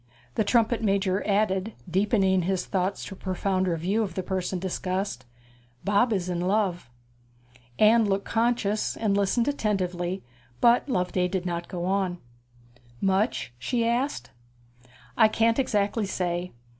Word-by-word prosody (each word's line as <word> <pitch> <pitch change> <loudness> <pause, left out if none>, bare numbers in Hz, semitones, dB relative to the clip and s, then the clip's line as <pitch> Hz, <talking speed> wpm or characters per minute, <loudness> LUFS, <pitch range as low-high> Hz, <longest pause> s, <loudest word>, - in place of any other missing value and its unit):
The 220 - +1
trumpet 230 +2 +2
major 195 -2 +1
added, 200 0 +1
deepening 190 0 +2
his 180 +1 -1
thoughts 190 0 -1
to - - -7
a - - -12
profounder 185 -2 0
view 190 +7 0
of 190 -5 -3
the 185 - -2
person 185 0 -2
discussed, 185 -5 -3 0.6
'Bob 205 +4 +3
is 190 -4 0
in 175 -1 -2
love.' 185 - 0 0.9
Anne 220 +1 +5
looked 195 -1 0
conscious, 225 -2 0
and 210 -3 +1
listened 200 +5 +1
attentively; 190 -8 -1 0.4
but 240 +4 +4
Loveday 180 -4 +1
did 180 0 -3
not 170 -1 -3
go 175 -1 -4
on. 190 -1 0 0.8
'Much?' 195 - 0
she 230 - 0
asked. 245 +5 -1 0.9
'I 220 - +7
can't 230 +3 +2
exactly 210 -3 0
say. 180 -1 -2
195 Hz, 135 wpm, -26 LUFS, 180-215 Hz, 0.9 s, I